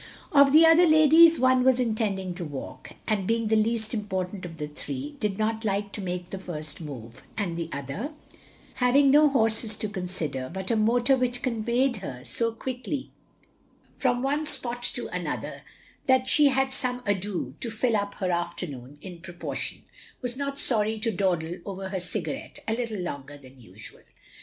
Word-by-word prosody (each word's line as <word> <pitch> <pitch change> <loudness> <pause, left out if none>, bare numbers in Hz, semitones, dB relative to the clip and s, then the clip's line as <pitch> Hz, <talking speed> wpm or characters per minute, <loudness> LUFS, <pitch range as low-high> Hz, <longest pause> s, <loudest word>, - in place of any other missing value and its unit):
Of 280 -2 +6
the 315 +3 +8
other 325 +2 +7
ladies, 315 +1 +7
one 255 0 +4
was 260 -1 +4
intending 215 -6 -1
to 175 0 -6
walk, 145 -4 -8
and 200 -4 0
being 230 -1 +1
the 220 - +3
least 220 +1 0
important 190 -3 -3
of 165 -1 -11
the 150 -1 -4
three, 275 - -6
did 210 -5 -1
not 220 +1 -1
like 200 -1 -1
to 205 - -6
make 180 -1 -4
the 195 - -5
first 155 -5 -6
move; 125 -5 -9 0.2
and 190 -6 -2
the 170 -1 -4
other, 140 - -4 0.7
having 265 +2 +4
no 300 +1 +6
horses 225 -4 +1
to 215 - -3
consider, 180 -9 -4
but 190 +3 -4
a - - +3
motor 240 +4 +3
which 250 -1 -2
conveyed 240 +1 +1
her 130 -11 -7
so 180 - -1
quickly 255 +4 -5 0.8
from 245 -1 0
one 290 +3 0
spot 245 -4 0
to - - -3
another - - -4 0.5
that 260 -1 +4
she 295 +2 +6
had 265 0 +2
some 250 -1 0
ado 195 - -2
to 235 - -4
fill 225 +1 0
up 200 -1 -2
her 185 -2 -1
afternoon 145 -6 -4
in 180 -3 -9
proportion, 175 -1 -5 0.4
was 245 -1 -3
not 280 +1 -3
sorry 220 -2 +4
to 225 +1 -1
dawdle 175 -3 -1
over 195 -1 -6
her 190 -1 -2
cigar 180 - 0
ette 295 +1 -9
a 220 - +1
little 230 -3 -3
longer 145 -4 -6
than 130 -2 -16
usual. 110 -1 -12
215 Hz, 175 wpm, -26 LUFS, 180-255 Hz, 0.8 s, the